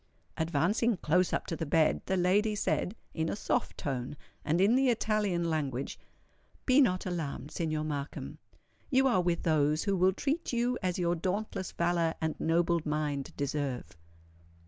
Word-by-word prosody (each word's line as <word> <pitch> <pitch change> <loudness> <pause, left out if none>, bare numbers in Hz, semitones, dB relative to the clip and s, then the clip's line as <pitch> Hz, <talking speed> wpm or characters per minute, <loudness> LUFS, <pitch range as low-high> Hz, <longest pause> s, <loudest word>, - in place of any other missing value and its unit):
Advancing 175 +8 +1
close 180 +3 +2
up - - -1
to 165 - -3
the 165 - -4
bed, 155 +1 +3
the 190 - +1
lady 205 +4 +2
said, 205 0 -1 0.2
in 160 0 -1
a - - -2
soft - - -1
tone, 135 0 -3 0.3
and 160 +3 +1
in 200 +4 +5
the 265 +1 +4
Italian 210 -7 +1
language:—"Be 155 - -2
not 185 -8 +2
alarmed, 160 -5 -4
Signor 155 -2 -2
Markham; 145 -2 -5 0.5
you 265 -1 +4
are 215 -9 +4
with 175 -1 0
those 155 -1 +2
who 200 - +1
will 185 +1 +3
treat 295 - -2
you 245 +1 +1
as 180 -2 -1
your 175 -1 +1
dauntless 190 +2 -2
valour 170 -1 +1
and 160 -1 -1
noble 170 +1 +2
mind 150 -3 -2
deserve." 140 - -3
170 Hz, 155 wpm, -30 LUFS, 155-200 Hz, 0.5 s, in